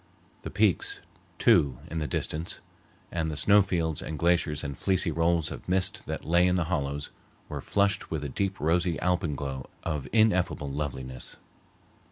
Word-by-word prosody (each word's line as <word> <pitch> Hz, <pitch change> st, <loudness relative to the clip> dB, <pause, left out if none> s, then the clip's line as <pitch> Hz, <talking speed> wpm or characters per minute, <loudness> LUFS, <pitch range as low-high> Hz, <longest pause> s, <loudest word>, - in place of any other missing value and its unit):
The -, -, -6 dB
peaks, 105 Hz, -4 st, +1 dB, 0.4 s
too, 70 Hz, -4 st, +4 dB
in 80 Hz, -, -2 dB
the 75 Hz, -, -2 dB
distance, 80 Hz, +3 st, -3 dB, 0.5 s
and 80 Hz, -2 st, -1 dB
the 75 Hz, -, -4 dB
snow 100 Hz, +7 st, +6 dB
fields 85 Hz, -5 st, -1 dB
and 75 Hz, -, -5 dB
glaciers 85 Hz, -2 st, +1 dB
and 70 Hz, -2 st, -4 dB
fleecy 95 Hz, +2 st, +1 dB
rolls 85 Hz, 0 st, +1 dB
of -, -, -8 dB
mist 90 Hz, 0 st, +1 dB
that -, -, -4 dB
lay 85 Hz, +2 st, +4 dB
in 90 Hz, -, +2 dB
the 90 Hz, -, +2 dB
hollows, 70 Hz, -2 st, -2 dB, 0.4 s
were -, -, -5 dB
flushed 100 Hz, -1 st, +1 dB
with 80 Hz, -2 st, -3 dB
a -, -, -2 dB
deep, 95 Hz, +6 st, -2 dB
rosy 85 Hz, +2 st, +1 dB
alpenglow 75 Hz, -7 st, -1 dB
of 75 Hz, -5 st, -2 dB
ineffable 90 Hz, -9 st, +2 dB
loveliness. 65 Hz, -3 st, -5 dB
80 Hz, 160 wpm, -28 LUFS, 75-90 Hz, 0.5 s, snow